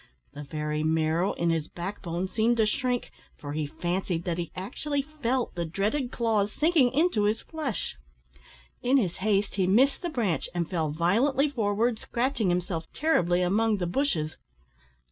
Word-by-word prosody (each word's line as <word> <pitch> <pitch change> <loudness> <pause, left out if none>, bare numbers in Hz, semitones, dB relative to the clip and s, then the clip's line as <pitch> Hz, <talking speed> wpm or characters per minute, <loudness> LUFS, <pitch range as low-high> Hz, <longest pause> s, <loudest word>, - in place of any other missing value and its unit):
The 145 - -7
very 150 +1 -2
marrow 160 +4 +1
in 170 0 +1
his 160 -2 -1
back 185 +4 -6
bone 175 +1 -2
seemed 225 +5 +1
to 220 - +4
shrink, 245 +3 -1 0.3
for 145 -1 -6
he 155 -1 -1
fancied 175 +2 -2
that 175 -1 -2
he 170 - -4
actually 280 +9 -2
felt 265 -4 -2
the 170 - -2
dreaded 210 - -1
claws 215 -3 +1
sinking 300 -4 +3
into 285 -8 +2
his 215 +2 +1
flesh. 295 - -4 0.8
In 255 +3 +3
his 190 -10 0
haste 200 0 +1
he 185 -2 +2
missed 255 +9 +4
the 350 - -2
branch, 225 - -1
and 170 -2 0
fell 165 -4 -1
violently 230 - +2
forward, 225 -1 +1
scratching 240 -4 0
himself 175 -2 -2
terribly 180 - +2
among 215 +4 +2
the 180 - -1
bushes. 175 - -1
200 Hz, 165 wpm, -27 LUFS, 170-245 Hz, 0.8 s, to